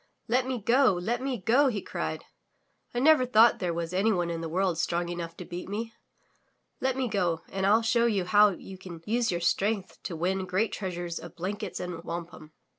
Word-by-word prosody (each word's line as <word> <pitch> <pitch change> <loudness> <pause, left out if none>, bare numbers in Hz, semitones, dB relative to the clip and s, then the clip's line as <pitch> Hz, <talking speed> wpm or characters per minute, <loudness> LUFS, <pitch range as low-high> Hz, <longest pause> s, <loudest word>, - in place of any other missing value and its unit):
"Let 255 +2 +1
me 260 -1 -1
go! 235 +1 +4
Let 225 +8 -2
me 265 -1 -2
go!" 240 +8 +3
he 220 -6 0
cried, 80 - -4 0.7
"I - - -6
never 300 +2 +5
thought 235 -2 +5
there 180 -2 -1
was 170 +1 -3
anyone 185 -3 +1
in 165 -1 -3
the 165 - -4
world 180 0 0
strong 170 +1 0
enough 170 -1 -5
to 180 - -7
beat 175 +1 -7
me. 225 +3 -4 0.9
Let 260 0 0
me 260 -1 0
go 175 -6 0
and 190 0 -1
ril 220 +3 +4
show 235 +1 +3
you 200 -5 0
how 205 +3 +6
you 190 0 -8
can 170 -3 -10
use 235 +1 +1
your 175 -1 -2
strength 195 +3 0
to 170 - -5
win 185 +3 -1
great 190 +5 0
treasures 175 -3 -4
of 170 - -11
blankets 190 +3 -4
and 175 -2 -5
wampum.'' 165 -2 -7
190 Hz, 200 wpm, -28 LUFS, 175-225 Hz, 0.9 s, how